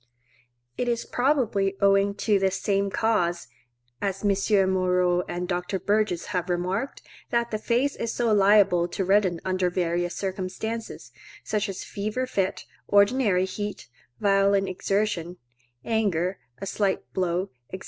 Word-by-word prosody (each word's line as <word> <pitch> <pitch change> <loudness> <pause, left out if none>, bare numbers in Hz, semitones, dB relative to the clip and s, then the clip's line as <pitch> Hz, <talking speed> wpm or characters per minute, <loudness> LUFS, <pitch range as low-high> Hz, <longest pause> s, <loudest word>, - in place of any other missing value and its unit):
It 245 - 0
is 235 -1 -1
probably 230 -8 +1
owing 200 0 +3
to 210 -3 +4
this 190 0 0
same 200 -1 +1
cause, 180 -5 0 0.5
as 195 0 -2
M. 200 -1 +3
Moreau 180 -1 +2
and 180 +1 -3
Dr. 180 +1 -2
Burgess 205 -2 0
have 180 0 -1
remarked, 185 +8 -2 0.3
that 235 0 0
the 215 - -2
face 245 +6 +1
is 230 - -3
so 235 -2 +1
liable 200 -3 +5
to 185 +2 -3
redden 190 -3 +3
under 185 -1 +1
various 175 0 -1
circumstances, 200 +4 -4 0.3
such 210 -1 -1
as 190 - -5
a - - -11
fever 215 +5 -3
fit, 195 -7 -2 0.2
ordinary 200 -2 +3
heat, 205 - -6 0.3
violent 195 -1 +3
exertion, 185 -2 -1 0.5
anger, 195 -5 0 0.2
a 195 - -6
slight 195 0 0
blow, 180 +1 -1 0.2
&c. 190 - -5
195 Hz, 140 wpm, -26 LUFS, 185-215 Hz, 0.5 s, liable